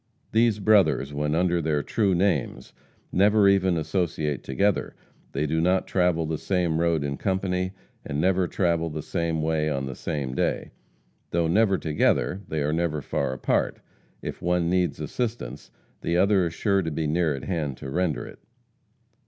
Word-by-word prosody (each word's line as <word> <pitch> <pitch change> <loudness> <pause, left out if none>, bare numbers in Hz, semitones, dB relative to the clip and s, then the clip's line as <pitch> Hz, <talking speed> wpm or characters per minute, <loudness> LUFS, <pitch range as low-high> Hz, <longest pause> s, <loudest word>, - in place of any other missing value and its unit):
These 115 -1 +3
brothers, 100 -9 +3
when 75 +1 -1
under 85 0 +2
their 75 -2 0
true 100 -5 +1
names, 85 -6 -1 0.4
never 100 +2 +4
even 95 -3 +3
associate 80 -3 -1
together. 100 +9 0 0.4
They 70 +3 0
do 80 +2 0
not 90 +2 +2
travel 90 -3 +1
the 80 0 -3
same 90 -4 0
road 85 -3 +1
in 70 -1 -3
company, 95 -1 -1 0.3
and 70 - -3
never 95 +1 +2
travel 85 -2 0
the 75 -1 -5
same 85 -2 -1
way 80 -1 +1
on 70 -2 -2
the 65 - -5
same 70 -2 -3
day. - - -1 0.6
Though 85 0 +1
never 100 +2 +3
together, 75 +1 +1
they 75 -2 -2
are 75 +1 0
never 80 -3 -1
far - - -1
apart. 65 - 0 0.4
If - - -6
one 90 -1 +1
needs 90 -3 +1
assistance 115 - -4 0.3
the 85 - 0
other 95 -1 +3
is 85 - -7
sure 100 0 +2
to 80 - -2
be 80 +1 -2
near 80 -1 +1
at 70 - -7
hand 75 -8 -2
to 65 - -7
render 90 -1 -1
it. - - -12
85 Hz, 170 wpm, -25 LUFS, 75-95 Hz, 0.6 s, never